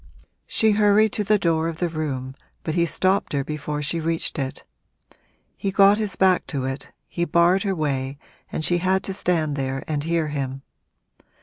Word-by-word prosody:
She 220 -1 +3
hurried 210 +1 +4
to 210 - 0
the 210 +1 +3
door 165 -4 +1
of 165 -1 -4
the 175 - 0
room, 140 -5 -4 0.3
but 160 - -2
he 170 0 +2
stopped 185 +2 +1
her 140 -1 0
before 150 0 -4
she 165 +4 -1
reached 165 0 -1
it. 135 -1 -4 0.9
He 200 - -2
got 195 +2 +5
his 210 -3 -1
back 185 -1 +3
to 135 -4 -3
it, 135 +1 -5 0.2
he 170 - -2
barred 170 +3 +3
her 195 -2 -1
way 140 -3 -2 0.3
and 155 - -1
she 175 0 +3
had 190 +2 +1
to 195 - -1
stand 165 -6 0
there 135 -1 -3
and 150 -2 -1
hear 165 -1 0
him. 135 -2 -4
165 Hz, 185 wpm, -23 LUFS, 145-190 Hz, 0.9 s, got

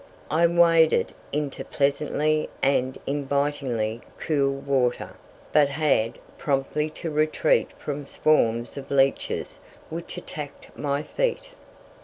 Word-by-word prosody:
I 165 +3 +4
waded 165 -2 +4 0.2
into 145 -1 -2
the - - -21
pleasantly 150 +2 +1
and 130 -1 +2
invitingly 140 -5 -1 0.2
cool 140 -3 +1
water, 135 -3 0 0.4
but 145 -2 +5
had 140 -6 +1 0.2
promptly 145 +2 0
to 165 - -3
retreat 155 - +2
from 145 -1 -5
swarms 120 -6 +1
of 135 0 -7
leeches 135 -1 +1 0.3
which 165 +1 -6
attacked 145 -2 -8
my 145 0 -1
feet. - - -1
145 Hz, 110 wpm, -25 LUFS, 135-155 Hz, 0.4 s, but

